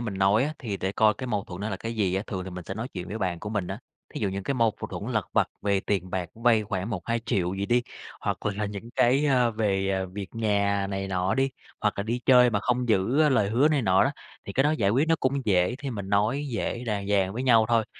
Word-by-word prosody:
mình 110 -5 -4
nói 100 +5 +3
á, 150 - -2
thì 110 -8 -4
để 95 0 -2
coi 110 0 +4
cái 130 - -6
mâu 105 -5 -1
thuẫn 90 0 -8
nó 105 - -2
là 95 - -2
cái 115 +4 -5
gì 95 -4 0
á, 95 - 0
thường 95 -2 -4
thì 95 - -7
mình 90 -1 -7
sẽ 95 - -5
nói 115 +4 -4
chuyện 90 -5 -7
với 105 +4 -4
bạn 90 -4 -2
của 105 - -5
mình 105 -4 -1
á. - - -5 0.4
Thí - - -4
dụ 100 - +1
những 100 +1 -4
cái 140 - -1
mâu 115 -3 +3
v - - -4
thuẫn - - -5
lặt - - 0
vặt - - +2
về 100 -1 +1
tiền 95 -2 -2
bạc, 90 -2 -2
vay 115 -1 +3
khoảng 100 +1 -3
1-2 115 +3 -2
triệu 90 -3 0
gì 100 +1 -2
đi, 120 +2 +2 0.4
hoặc - - -3
là 105 0 -1
những 105 +3 -7
cái, 135 +5 +4
à, 125 -4 +3
về, 100 -3 0
à, 95 -1 0
việc 100 -1 -5
nhà 100 -3 +1
này 95 0 -3
nọ 95 0 0
đi, 135 0 +1 0.3
hoặc - - +1
là 100 - -1
đi 115 +4 -2
chơi 125 -1 +7
mà 105 -2 0
không 125 +2 0
giữ, 110 +6 +2
ơ, 155 - +5
lời 105 -8 +2
hứa 130 +7 +4
này 150 -4 +1
nọ 95 -3 +4
đó, - - +1 0.3
thì 100 - -6
cái 135 - +3
đó 150 - +4
giải 110 -11 +1
quyết 135 +9 +2
nó 165 - +4
cũng 135 0 0
dễ. 90 +1 +3
Thì 140 -1 -4
mình 100 -5 -5
nói 105 +9 +1
dễ 120 +1 -3
đàng 100 -3 -2
dàng 95 -2 +2
với 120 +4 -3
nhau 115 -4 +5
thôi, 115 -2 +3
105 Hz, 285 wpm, -26 LUFS, 95-120 Hz, 0.4 s, chơi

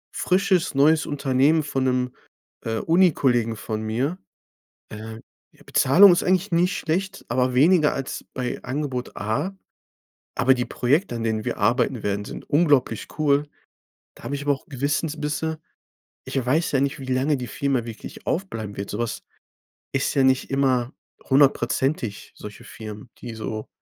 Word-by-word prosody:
frisches 185 -4 +1
neues 155 +3 +4
Unternehmen 145 +2 +2
von 135 -2 -2
'nem, 125 -1 0 0.5
äh, 110 -1 -1
Uni-Kollegen 135 -10 +2
von 110 +1 -4
mir, 130 +11 -1 0.7
äh. 110 +1 -8 0.4
Die - - -20
Bezahlung 180 +8 +6
ist 175 - +2
eigentlich 185 +2 +1
nicht 175 +2 +2
schlecht, 190 +5 -2
aber 130 0 +1
weniger 155 +3 +5
als 135 -1 -5
bei 125 -1 -3
Angebot 130 -2 -4
A. 110 - -2 0.8
Aber 130 +2 +4
die 125 -1 -1
Projekte, 140 +3 0
an 115 - -3
denen 110 -1 -1
wir - - -3
arbeiten 120 +2 +1
werden, 100 0 -1
sind - - -9
unglaublich 145 -8 +2
cool. 145 -1 +2 0.7
Da - - -16
habe 145 - -3
ich 140 - -5
aber 145 - +2
auch 135 - -9
Gewissensbisse. 150 +3 -2 0.7
Ich 135 -3 -2
weiß 155 +5 +1
ja 135 - +3
nicht, 140 0 -1
wie 135 - -7
lange 130 +3 +1
die 125 -1 -5
Firma 135 -4 -1
wirklich 115 -1 -9
aufbleiben 115 - -3
wird 100 - -5
sowas 115 +2 -3 0.7
ist 135 - 0
ja 135 - +4
nicht 130 -1 +2
immer 130 -2 +1 0.4
hundertprozentig, 135 -4 +1
solche 105 -1 -10
Firmen, 110 +1 -9
die 120 -2 -7
so 110 0 -5
135 Hz, 150 wpm, -23 LUFS, 120-150 Hz, 0.8 s, Bezahlung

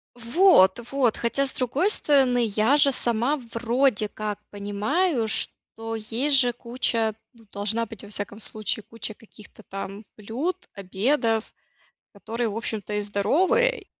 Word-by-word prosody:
Вот, 240 - +5
вот, 265 -5 +2
хотя, 275 +4 0
с - - -4
другой 275 - +1
стороны, 265 - +3
я 220 +7 +4
же 280 -1 +5
сама 245 +4 +1
вроде 235 -1 +1
как 210 0 -4
понимаю, 220 - 0
что 225 +1 -3
есть 235 +7 +1
же 245 -2 +3
куча, 235 -2 -1 0.2
ну, 230 -3 -21
должна 215 +3 -1
быть, 220 -2 -11
во 205 - -12
всяком 205 0 -5
случае, 215 0 -3
куча 225 0 -7
каких-то 215 0 -16
там 195 +2 -7
блюд, 275 - -4
обедов, 220 +4 0 0.6
которые, 230 +3 -3
в 210 - -5
общем-то, 215 -3 -4
и 210 - 0
здоровые, 340 - +1
230 Hz, 135 wpm, -25 LUFS, 210-265 Hz, 0.6 s, Вот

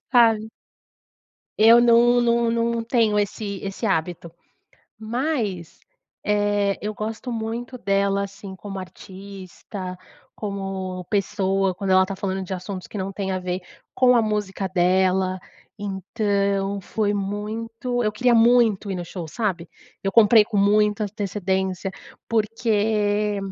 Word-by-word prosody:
Sabe? 225 -3 +4 1.1
Eu 230 +2 +8
não 240 +1 +5
não 235 0 +2
não 230 0 0
tenho 225 -3 +2
esse 205 0 -2
esse 195 +4 -5
hábito, 170 -3 -1 0.7
mas, 220 - -3 0.5
eh, 205 -1 +1
eu 210 +1 -2
gosto 220 +4 -5
muito 235 +2 -4
dela, 200 0 +1
assim, 200 -1 -9
como 195 +1 -7
artista, 185 0 -9 0.4
como 195 -3 -4
pessoa, 195 -2 0
quando 195 -1 -3
ela 185 0 +6
está 190 +1 -3
falando 190 0 -3
de 190 - -7
assuntos 185 0 -6
que 210 - -6
não 190 +1 -3
têm 190 -1 -3
a 185 - -1
ver 180 0 -3 0.3
com 250 -1 +5
a - - +5
música 205 -3 -2
dela, 185 +1 +2 0.4
então 200 0 -1
foi 205 +2 -1
muito 225 +5 -3
eu 215 - +1
queria 240 +3 +2
muito 225 -3 +4
ir 190 - -2
no 175 - -4
show, 170 -1 -7
sabe? 180 -3 -2 0.3
Eu 195 - 0
comprei 220 0 +6
com 210 -1 -4
muita 210 +1 +3
antecedência 190 -2 -2 0.4
porque 210 -2 +1
205 Hz, 130 wpm, -23 LUFS, 190-225 Hz, 1.1 s, Eu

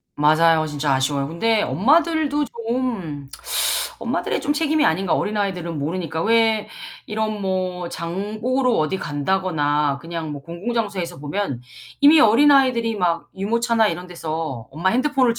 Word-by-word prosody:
맞아요. 155 +2 +4
진짜 145 -2 -1
아쉬워요. 140 +1 0
근데 210 +7 +1
엄마들도 295 - +2
좀 225 - -4 0.7
엄마들의 - - -2
좀 290 - -1
책임이 310 0 +1
아닌가. 180 +3 +1
어린아이들은 190 -6 -2
모르니까. 160 +1 -3
왜 225 -2 +2 0.4
이런 215 -1 -3
뭐 185 -2 -2
장 195 +6 -5
보러 255 +1 +1
어디 170 +1 0
간다거나 145 -3 0
그냥 165 -1 -5
뭐 145 -1 -7
공공장소에서 195 - -3
보면 145 -4 -3 0.4
이미 300 +2 +7
어린아이들이 245 -1 +4
막 175 -3 -1
유모차나 225 +2 +1
이런 180 +2 -5
데서 160 -8 -5
엄마 170 +6 0
핸드폰을 255 0 +2
190 Hz, 330 characters per minute, -21 LUFS, 160-230 Hz, 0.7 s, 이미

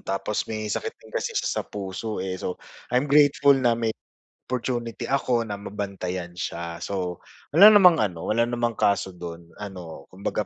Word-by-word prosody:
tapos 95 +2 -2
may 110 -1 -3
sakit - - -3
din - - -18
kasi - - -2
siya - - 0
sa - - -4
puso, 105 +2 -5
eh, 95 0 -3
so 90 - -3 0.3
I'm 125 +2 +2
grateful 145 -1 +6
na 125 -3 +2
may 115 -1 0 0.5
opportunity 120 -2 -3
ako 125 -3 +1
na 105 -3 -4
mabantayan 95 -4 -5
siya. 85 -2 -4
So 90 -1 -4 0.2
wala 200 +8 +9
namang 180 -5 +7
ano, 90 - -2
wala 115 +2 +3
namang 120 -1 -1
kaso 100 -1 +2
do'n 85 -1 -8
ano 90 -6 -8
kumbaga 95 +2 -2
105 Hz, 165 wpm, -25 LUFS, 90-120 Hz, 0.5 s, wala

